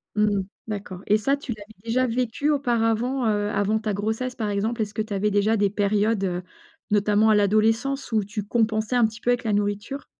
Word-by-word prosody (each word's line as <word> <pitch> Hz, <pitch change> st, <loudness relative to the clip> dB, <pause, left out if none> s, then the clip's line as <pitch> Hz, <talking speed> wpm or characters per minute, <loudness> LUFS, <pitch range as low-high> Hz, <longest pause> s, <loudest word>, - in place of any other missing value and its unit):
Mmh, 210 Hz, -2 st, +2 dB, 0.3 s
d'accord, 200 Hz, -4 st, -6 dB
et 210 Hz, -, +4 dB
ça 270 Hz, +7 st, +1 dB
tu 285 Hz, -3 st, -7 dB
l'avais 215 Hz, 0 st, -13 dB
déjà 250 Hz, +3 st, +1 dB
vécu 250 Hz, +4 st, -1 dB
auparavant, 245 Hz, -2 st, +1 dB
heu, 205 Hz, -1 st, +1 dB
avant 205 Hz, +2 st, +1 dB
ta 215 Hz, -1 st, -2 dB
grossesse 220 Hz, +5 st, -2 dB
par 220 Hz, -4 st, -2 dB
exemple? 220 Hz, +3 st, -1 dB
Est-ce 210 Hz, -1 st, -3 dB
que 220 Hz, -, -1 dB
tu 215 Hz, -, -7 dB
avais 200 Hz, +2 st, +1 dB
déjà 205 Hz, +2 st, +2 dB
des 205 Hz, -2 st, +2 dB
périodes, 205 Hz, +1 st, +1 dB
heu, 180 Hz, -2 st, -1 dB, 0.5 s
notamment 210 Hz, +1 st, +3 dB
à 215 Hz, -, +5 dB
l'adolescence 225 Hz, +7 st, +1 dB
où 215 Hz, -2 st, +2 dB
tu 205 Hz, +2 st, -5 dB
compensais 220 Hz, +2 st, 0 dB
un 240 Hz, -2 st, +5 dB
petit 220 Hz, 0 st, -5 dB
peu -, -, -1 dB
avec 245 Hz, 0 st, +2 dB
la 220 Hz, -3 st, 0 dB
nourriture? 205 Hz, +7 st, -2 dB
215 Hz, 205 wpm, -24 LUFS, 205-235 Hz, 0.5 s, à